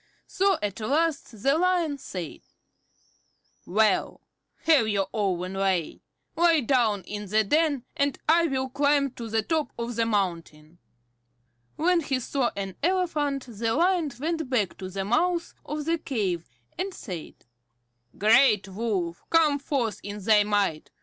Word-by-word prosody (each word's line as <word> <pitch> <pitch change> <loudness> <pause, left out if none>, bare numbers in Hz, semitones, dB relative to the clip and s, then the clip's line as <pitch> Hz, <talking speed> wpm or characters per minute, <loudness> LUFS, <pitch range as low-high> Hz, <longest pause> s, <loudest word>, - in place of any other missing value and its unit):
So 390 -2 +1
at 205 0 -3
last 280 -3 -1
the 275 +4 +3
Lion 345 -5 +1
said: 180 - -7 1.3
"Well, 210 +1 +1 0.4
have 305 -9 +4
your 200 -2 0
own 185 -3 -1
way. 190 -4 -1 0.3
Lie 335 -2 +4
down 230 -6 +1
in 205 +2 -6
the 215 +3 +2
den, 295 +2 +1
and 280 0 0
I 335 +2 +4
will 265 -2 -1
climb 285 0 +2
to 235 -2 -8
the 220 0 0
top 310 0 -1
of 235 0 -4
the 230 0 +1
mountain." 170 -6 -3 1.0
When 355 +2 +2
he 275 -5 -1
saw 255 0 0
an 195 -2 -5
elephant 305 -6 0
the 225 0 -2
Lion 345 -2 +2
went 320 -1 -2
back 220 -8 0
to 185 - -6
the 195 +1 -4
mouth 335 - 0
of 300 0 -5
the 330 +1 0
cave, 195 - -2 0.3
and 385 +2 -2
said: 175 -6 -7 0.8
"Great 215 -2 +4
Wolf, 190 -5 -2
come 310 -3 +4
forth 260 -6 -2
in 205 0 -6
thy 210 +1 +4
might. 205 -6 0
235 Hz, 145 wpm, -26 LUFS, 200-305 Hz, 1.3 s, have